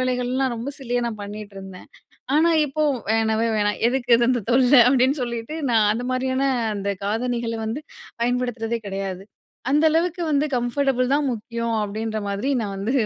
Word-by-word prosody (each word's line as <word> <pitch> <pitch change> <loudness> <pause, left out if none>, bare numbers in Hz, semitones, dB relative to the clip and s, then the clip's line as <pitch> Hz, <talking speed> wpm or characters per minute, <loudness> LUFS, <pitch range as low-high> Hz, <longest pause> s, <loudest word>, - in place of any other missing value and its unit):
வேலைகள்லாம் 255 +1 0
ரொம்ப 240 +5 -4
சில்லியா 245 -2 -1
நான் 225 -2 -4
பண்ணிட்டிருந்தேன். 200 -2 -9 0.5
ஆனா 330 +2 +4 0.2
இப்போ, 300 +2 -2 0.3
"வேணவே 225 0 +1
வேணாம். 205 0 0
எதுக்கு 245 -1 +1
இது? 235 +1 +3
அந்த 250 -2 +1
தொல்ல." 250 +1 +4 0.2
அப்பிடின்னு 265 +2 +3
சொல்லிட்டு, 235 +4 -4 0.2
நான் 215 -2 +4
அந்த 240 +3 -4
மாதிரியான 260 +1 0 0.3
அந்த 200 0 -3 0.2
காதணிகள 230 +2 -1
வந்து 225 +7 -3 0.4
பயன்படுத்துறதே 240 -2 -1
கிடையாது. 195 -1 -4 0.5
அந்த 300 +2 +3
அளவுக்கு 340 +2 0
வந்து 290 +1 +2
கம்ஃபர்டபுள் 255 +1 +1
தான் 290 -1 +1
முக்கியம் 230 +1 -3
அப்பிடின்றமாரி 215 +2 -3
நான் 200 -2 -4
வந்து 200 +5 -2
240 Hz, 145 wpm, -23 LUFS, 215-260 Hz, 0.5 s, ஆனா